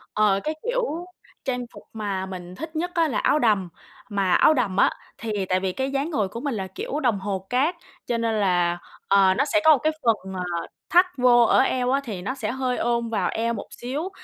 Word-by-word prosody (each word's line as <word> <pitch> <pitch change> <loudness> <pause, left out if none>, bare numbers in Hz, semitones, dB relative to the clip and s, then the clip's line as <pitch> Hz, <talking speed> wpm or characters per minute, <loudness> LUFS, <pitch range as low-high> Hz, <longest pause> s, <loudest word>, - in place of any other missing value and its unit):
Ờ, 210 -2 +3
cái 310 +1 -2
kiểu 465 -9 -1 0.4
trang 250 -2 -2
phục - - -12
mà 200 -3 -3
mình 180 -1 -8
thích 320 - -7
nhất 350 +3 -2
á 335 -2 +2
là 255 - -2
áo 300 - +2
đầm. 205 -7 +2 0.4
Mà 195 -3 +1
áo 310 - +6
đầm 205 -9 0
á, - - +5 0.3
thì 210 -3 -3
tại 185 0 +2
vì 190 -1 -1
cái 265 +5 -2
dáng 275 +4 -1
người 215 - 0
của 230 - -7
mình 270 -2 -2
là 190 -2 -3
kiểu 270 +10 -4
đồng 235 -8 +1
hồ 190 -1 -3
cát, 280 +8 +1 0.3
cho 240 - -1
nên 230 -1 0
là, 175 -3 +2 0.3
ờ, 195 -1 +5
nó 245 - +1
sẽ 315 - +5
có 310 -3 +8
cái 310 +4 +1
phần, 210 -5 0
ờ, 185 -1 -3 0.5
thắt 360 +2 +6
vô 245 -1 +6
ở - - +4
eo 255 -1 +2
á 275 +1 +2
thì 205 -8 -6
nó 255 +8 -3
sẽ 235 -5 -3
hơi 255 -1 -1
ôm 235 -1 0
vào 200 -5 0
eo 230 +1 0
một 205 - -6
xíu, 285 +9 -3
235 Hz, 230 wpm, -24 LUFS, 195-275 Hz, 0.5 s, có